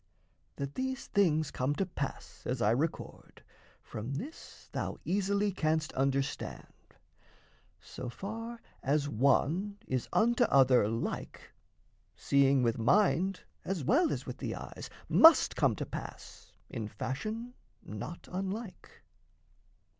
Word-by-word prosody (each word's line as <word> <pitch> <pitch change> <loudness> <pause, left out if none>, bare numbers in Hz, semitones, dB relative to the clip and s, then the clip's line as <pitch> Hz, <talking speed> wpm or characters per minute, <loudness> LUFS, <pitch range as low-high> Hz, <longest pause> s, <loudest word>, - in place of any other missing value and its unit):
That 140 0 -4
these 260 0 -3
things 160 -7 +2
come 130 +3 -1
to 195 - 0
pass 145 -6 -6
as 125 0 -1
I 105 -2 +3
record, 150 +7 -3 0.4
From 115 +6 -5
this 285 - -8
thou - - -3
easily 200 +2 +1
canst 155 -3 0
understand: 135 +1 -3 0.8
So 125 - -7
far 225 - -6 0.2
as 145 +1 +1
one 150 - +2
is 130 -2 -2
unto 240 +2 +4
other 130 - +5
like, 115 +2 -4 0.6
Seeing 140 -1 +3
with 115 -1 +1
mind 190 - +3 0.2
as 185 -6 -2
well 295 - +3
as - - -3
with - - -7
the - - -3
eyes - - -8 0.2
Must 325 0 +7
come - - +3
to - - -4
pass - - -9 0.2
in 115 -4 -5
fashion 215 - -4 0.3
not 105 +11 -7
unlike. 195 +3 -5
155 Hz, 120 wpm, -31 LUFS, 130-205 Hz, 0.8 s, Must